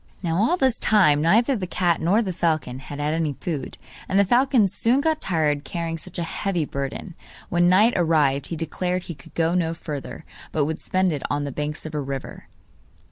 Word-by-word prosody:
Now 165 -1 0
all 235 - +2
this 260 -7 +1
time 170 -9 +4
neither 225 - +3
the 190 -5 -3
cat 175 -2 +1
nor 200 +8 +3
the 190 -3 -3
falcon 155 -7 -1
had 140 +1 -8
had 150 +1 0
any 160 -3 0
food, 150 +1 -5 0.3
and 195 - +1
the 200 - +5
falcon 245 0 +4
soon 230 +7 +1
got 315 +1 0
tired 150 -5 +1
carrying 165 +2 -4
such 180 +2 -10
a 175 - -1
heavy 175 -1 -2
burden. 140 +7 -5 0.4
When 175 0 +3
night 210 +6 +5
arrived 150 -5 +2
he 170 - -4
declared 180 +3 -2
he 170 - -6
could 140 - -17
go 165 0 +1
no 165 -2 0
further, 150 -1 -7 0.3
but 150 -2 +1
would 160 +2 -3
spend 185 -1 +1
it 145 - -3
on 145 0 -1
the 140 - -4
banks 150 +3 -4
of 155 - -6
a 150 - -1
river. 135 -1 -6
165 Hz, 205 wpm, -23 LUFS, 150-190 Hz, 0.4 s, the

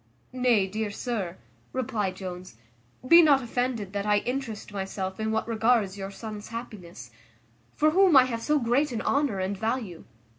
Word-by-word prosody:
"Nay, 245 -6 +3
dear 215 +2 -3
sir," 200 -5 -4 0.4
replied 215 -7 -2
Jones, 185 - -8 0.5
"be 335 +5 +9
not 285 -5 +4
offended 235 -4 -2
that 200 0 -2
I 210 0 +4
interest 245 -5 -5
myself 190 -1 -4
in 220 0 -1
what 220 +1 -1
regards 225 -3 +2
your 195 -1 -6
son's 210 +1 -8
happiness, 185 - -9 0.6
for 310 +1 +3
whom 365 -3 +5
I 260 - +9
have 235 -3 -3
so 300 +5 +2
great 265 +3 +1
an 230 - -3
honour 280 -7 +1
and 190 +2 -2
value. 220 -4 -3
220 Hz, 160 wpm, -27 LUFS, 195-255 Hz, 0.6 s, be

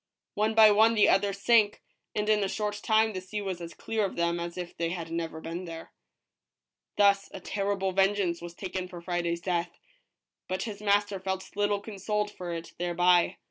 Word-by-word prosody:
One 215 +1 0
by 220 -1 +8
one 220 +2 +5
the 210 - +5
others 200 0 +2
sank, 215 -2 +3 0.3
and 210 0 -1
in 210 -1 +3
a - - +1
short 210 0 -2
time 220 0 +3
the 185 - -4
sea 190 +3 -5
was 190 -3 -4
as 170 0 -8
clear 220 -1 -2
of 195 - -2
them 170 0 0
as 170 +1 -5
if 175 -1 -6
they 165 0 -1
had 165 -2 -5
never 165 -1 -3
been 170 +3 -6
there. 165 -1 -8 1.1
Thus 200 -1 +4
a - - -7
terrible 195 -1 -1
vengeance 195 -2 +1
was 170 0 -8
taken 185 -1 -4
for 180 -1 -9
Friday's 170 -1 -2
death, 175 -1 -1 0.8
but 185 +1 -2
his 210 -3 -6
master 205 -1 +2
felt 190 0 -4
little 205 0 +1
consoled 210 0 -2
for 180 -3 -6
it 165 0 -6
thereby. 175 0 +3
190 Hz, 190 wpm, -28 LUFS, 175-205 Hz, 1.1 s, by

